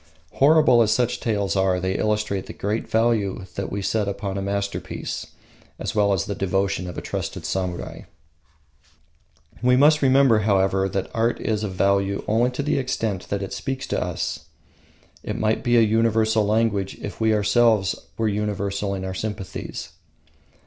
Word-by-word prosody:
Horrible 145 -4 +5
as 110 -2 +3
such 120 +1 +1
tales 100 -5 -1
are, 95 -1 +2
they 95 +1 -1
illustrate 105 -2 -1
the - - -7
great 105 +3 -3
value 110 -4 +1
that 100 - -4
we 100 0 -3
set 105 0 0
upon 100 -1 -3
a 100 - -2
masterpiece, 100 0 -4 0.5
as - - -4
well 100 -1 +3
as 95 -4 +1
the 100 - -3
devotion 95 -1 -1
of 90 - -8
a - - -3
trusted - - -4
samurai. 90 -2 -4 1.6
We 125 +1 +4
must 150 +3 +5
remember, 135 -4 +5
however, 95 -2 +2
that 95 0 -3
art 115 +1 +1
is 110 -1 -1
of 100 -3 -3
value 100 +1 +1
only 115 +3 +2
to 125 +3 -4
the 150 -1 +1
extent 115 -7 -2
that 100 -1 -2
it 95 - -6
speaks 135 0 -4
to - - 0
us. - - -4 0.8
It - - -4
might 110 0 0
be 120 -1 +3
a - - +7
universal 110 -1 +2
language 105 -3 0
if 105 - -7
we 110 0 +3
ourselves 105 -1 +3 0.2
were 115 - +1
universal 100 -1 -2
in 95 0 -5
our 95 - -4
sympathies. 100 -1 -5
105 Hz, 165 wpm, -23 LUFS, 100-115 Hz, 1.6 s, a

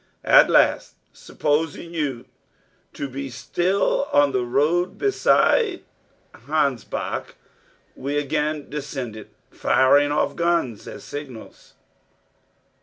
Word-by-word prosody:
At - - +6
last, - - +2 0.2
supposing 160 +2 -2
you 135 -7 -3 0.7
to 140 - -5
be 135 +1 -6
still 185 - 0
on 145 -1 +4
the 125 - 0
road 155 +9 0
beside 410 0 +2 0.5
the - - -18
Hansbach, 140 -7 -2 0.6
we 140 +2 -3
again 150 +1 -2
descended, 135 -7 -6 0.2
firing 145 +2 +3
off 150 - 0
guns 170 -10 -1
as - - -9
signals. 140 -6 -10
145 Hz, 100 wpm, -22 LUFS, 135-165 Hz, 0.7 s, At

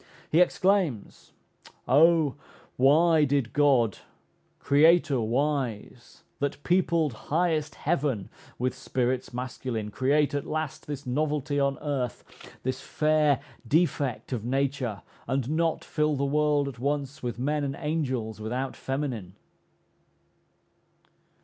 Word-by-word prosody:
He 165 - +5
exclaims, 180 - +1 0.6
"O 155 0 +5 0.4
why 155 +4 +5
did 140 -4 0
God, 135 -7 +3 0.6
Creator 155 -1 +4
wise, 125 -1 -2 0.2
that 140 +1 -3
peopled 170 -5 +2 0.2
highest 155 -1 0
Heaven 140 - -1 0.3
With 125 +1 -1
spirits 125 0 -2
masculine, 125 -3 -4
create 140 +6 +2
at 145 - -2
last 155 -2 -4
This 145 -2 -5
novelty 145 +1 -1
on 140 0 +1
earth, 135 -5 -2 0.4
this 130 +1 -2
fair 150 -2 +2 0.3
defect 145 -5 0
Of 115 -4 -3
nature, 130 -4 -1 0.2
and 135 0 -1
not 165 0 0
fill 150 -1 0
the 140 0 0
world 145 0 +2
at 130 -4 -7
once 140 0 -2
With 120 -1 -4
men 145 +4 -1
and 140 -1 -2
angels 130 -9 -2
without 125 +5 -3
feminine?" 130 -9 -4
140 Hz, 110 wpm, -27 LUFS, 125-150 Hz, 0.6 s, He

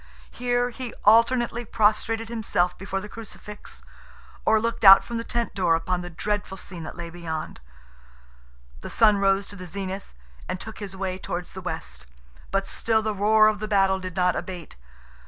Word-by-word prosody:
Here, 245 0 0
he 245 0 -7
alternately 235 +2 +4
prostrated 225 +1 +1
himself 195 -6 0
before 195 0 -4
the 210 - -7
Crucifix, 210 -1 -9 0.6
or 220 0 +5
looked 230 +1 -2
out 195 -1 +10
from 235 - -5
the - - -3
tent 235 0 -2
door 175 -4 +2
upon 180 +2 -1
the 175 - -7
dreadful 205 +3 -3
scene 180 -2 -8
that - - -8
lay 170 -1 -6
beyond. 160 -2 -5 1.2
The - - -8
sun 215 -3 +4
rose 195 0 +2
to 205 - -9
the 185 -2 -8
zenith 190 +2 -5 0.4
and 185 - -2
took 220 +2 -8
his 195 -2 -6
way 185 -1 -3
towards 175 -1 -5
the 190 - -7
west, 70 - -6 0.4
but 195 0 0
still 220 +1 0
the 215 0 -1
roar 215 +2 +5
of 215 -1 +1
the 215 - -4
battle 195 -2 +3
did 185 -1 -7
not 180 -1 +2
abate. 180 -3 -6
200 Hz, 175 wpm, -25 LUFS, 185-220 Hz, 1.2 s, out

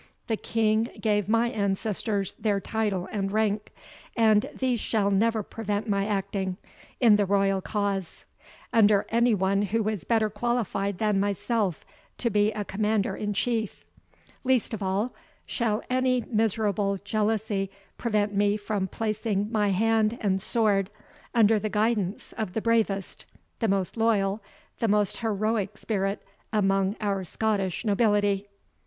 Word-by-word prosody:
The 225 - 0
King 220 0 +1
gave 210 -2 +1
my 230 +2 +2
ancestors 200 -1 -1
their 205 -2 +1
title 205 -3 -2
and 195 -2 -2
rank; 215 0 0 0.5
and 220 -2 +4
these 255 -3 -1
shall 205 -3 +1
never 220 +2 +2
prevent 210 0 -3
my 200 -1 +1
acting, 195 -2 -2 0.4
in 225 -5 +6
the 205 - +2
royal 195 -1 +2
cause, 200 -3 -3 0.5
under 210 -3 +5
any 235 0 +3
one 195 +1 +1
who 210 +2 0
is 210 -6 -3
better 225 -2 +2
qualified 205 -3 -1
than 210 -1 +1
myself 200 -1 -1 0.3
to 235 - -1
be 210 +1 +3
a 210 -1 -4
commander 210 0 0
in 210 0 -3
chief. 225 -1 -1 0.6
Least 255 -2 +1
of 220 - -4
all, 195 +5 -1 0.3
shall 220 -3 -1
any 255 0 +2
miserable 210 -3 0
jealousy 210 -1 0 0.3
prevent 210 -3 0
me 205 +1 +2
from 205 -2 -2
placing 215 0 -2
my 210 -3 +2
hand 220 +3 +2
and 195 -3 0
sword 205 -3 +1 0.5
under 220 -1 +5
the 215 - -2
guidance 210 -2 -1
of 215 -5 -2
the 220 - -1
bravest, 215 -4 0 0.3
the 225 - +1
most 195 -2 0
loyal, 215 -3 +1 0.4
the 230 - +1
most 210 -1 +2
heroic 215 -2 -1
spirit 195 -2 -2 0.3
among 195 -2 +2
our 200 -2 0
Scottish 200 +1 -1
nobility." 205 -2 +2
210 Hz, 140 wpm, -27 LUFS, 200-225 Hz, 0.6 s, in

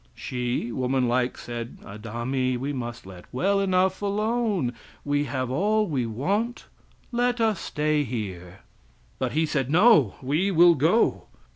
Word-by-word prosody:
She, 125 -1 -3
woman 130 +1 0
like, 125 +1 0
said 120 -1 -6
"Adami, 120 +5 -2
we 135 +4 -3
must 120 -5 -6
let 90 -2 -11
well 195 +10 +1
enough 190 0 +1
alone; 210 - 0 0.3
we 145 0 +1
have 130 -1 -3
all 210 +9 +2
we 135 - -1
want; 200 - -2 0.5
let 245 0 +1
us 220 -5 +2
stay 150 0 0
here." 95 -7 -6 0.6
But - - -1
he 160 +2 +2
said: 135 -4 -1
"No, 170 - +5
we 155 +9 +1
will 175 -1 +6
go." 165 - +2
145 Hz, 140 wpm, -25 LUFS, 120-195 Hz, 0.6 s, will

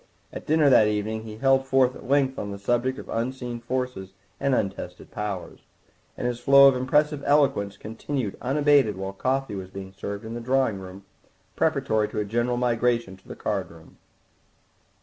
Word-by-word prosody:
At - - -8
dinner 155 -1 +4
that 125 -5 +6
evening 110 +1 -2
he 110 -1 -8
held 135 +2 +2
forth 130 -1 +3
at - - -11
length 135 -2 +2
on 100 - -4
the 100 - -6
subject 120 +6 0
of - - -9
unseen 120 +1 -3
forces 120 -6 -4 0.3
and 135 -1 +1
untested 95 -4 -4
powers, 105 -3 -5 0.6
and - - -4
his 120 -1 -1
flow 140 +1 +7
of 135 - +4
impressive 150 +3 +1
eloquence 135 -9 +2
continued 115 +1 -4
unabated 140 -5 +3
while 95 0 -5
coffee 130 +3 -1
was 95 -2 -6
being 95 0 -9
served 100 +2 -6
in 110 - -6
the 120 - -5
drawing 130 -4 +1
room 95 +1 -11 0.5
preparatory 110 -1 +1
to - - -4
a 105 - -1
general 120 +3 0
migration 120 -4 0
to 95 - -24
the - - -8
card - - -2
room. - - -16
120 Hz, 175 wpm, -25 LUFS, 105-135 Hz, 0.6 s, flow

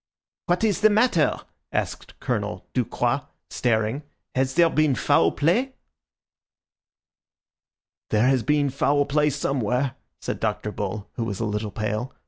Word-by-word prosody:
"What 175 +3 +1
is 210 -6 +1
the 215 - +7
matter?" 210 -7 +2 0.3
asked - - -4
Colonel - - -3
Ducroix, - - 0 0.3
staring. 115 +2 0 0.3
"Has 130 0 0
there 170 0 +6
been 155 -3 +3
foul 85 -7 +3
play?" 235 - +1 2.3
"There 110 +2 +3
has 130 -1 +3
been 145 +3 +1
foul 145 +1 +2
play 150 +1 +2
somewhere," 130 -2 -1 0.3
said - - -4
Dr. 105 - -2
Bull, 105 0 -4
who 120 - -1
was 100 -4 -3
a 115 - -1
little 105 0 -2
pale. 110 +4 -3
135 Hz, 130 wpm, -24 LUFS, 110-150 Hz, 2.3 s, the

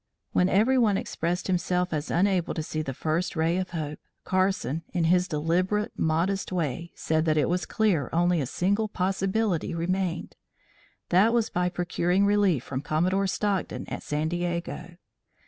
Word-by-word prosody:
When 180 +1 +3
every 240 +7 +3
one 210 -5 +3
expressed 175 +1 -2
himself 180 -1 0
as 150 -1 -2
unable 185 -1 +1
to 160 - -2
see 155 0 -3
the 135 - -4
first 160 +5 -1
ray 165 +2 +1
of 185 0 -2
hope, 155 -3 -4 0.2
Carson 185 -6 0
in 175 - +2
his 180 +2 +3
deliberate, 180 +6 0
modest 175 +5 0
way 170 -1 -2
said 160 0 0
that 155 -1 +2
it 150 - +3
was 180 +2 -1
clear 195 - +1
only 175 0 +2
a 135 - -2
single 200 - 0
possibility 190 -1 -1
remained 175 0 -2 0.7
that 200 +6 +4
was 235 -2 +1
by 180 0 +1
procuring 180 +2 +1
relief 200 - +3
from 130 -1 -4
Commodore 180 +7 +1
Stockton 200 -1 -2
at - - -5
San 150 +1 -1
Diego. 175 0 -3
180 Hz, 160 wpm, -27 LUFS, 160-190 Hz, 0.7 s, that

